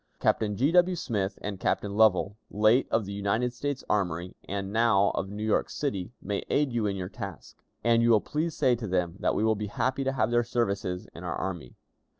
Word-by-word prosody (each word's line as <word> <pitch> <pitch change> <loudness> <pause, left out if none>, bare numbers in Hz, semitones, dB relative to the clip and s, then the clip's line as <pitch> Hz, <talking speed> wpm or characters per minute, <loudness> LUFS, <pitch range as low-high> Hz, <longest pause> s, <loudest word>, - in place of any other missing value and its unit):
Captain 105 -2 +1
G. 140 +6 +3
W. 180 +1 +4
Smith 100 - -2
and 100 -2 -4
Captain 100 +1 -1
Lovell, 105 -2 +4
late 110 +5 +3
of 115 -2 +1
the 100 - -6
United 100 +5 0
States 145 +1 -3
Army, 90 -3 -1
and 100 0 -3
now 110 -3 +4
of 95 - -3
New 105 +1 -5
York 110 - +1
City, 110 -10 -3
may 100 -1 -2
aid 145 -4 +1
you 115 -3 +1
in 100 - -1
your 90 -2 -4
task; 100 -5 -9 0.2
and 115 0 +4
you 115 - +3
will 110 -2 +6
please 155 +7 -2
say 130 - +4
to 115 -2 -5
them 90 -2 0
that - - +1
we - - +1
will 110 0 +4
be 105 0 -4
happy 130 +6 -1
to 135 0 0
have 130 - +1
their 120 0 +3
services 100 -6 -2
in - - -10
our - - -3
army. 85 -9 -5
105 Hz, 215 wpm, -28 LUFS, 100-120 Hz, 0.2 s, will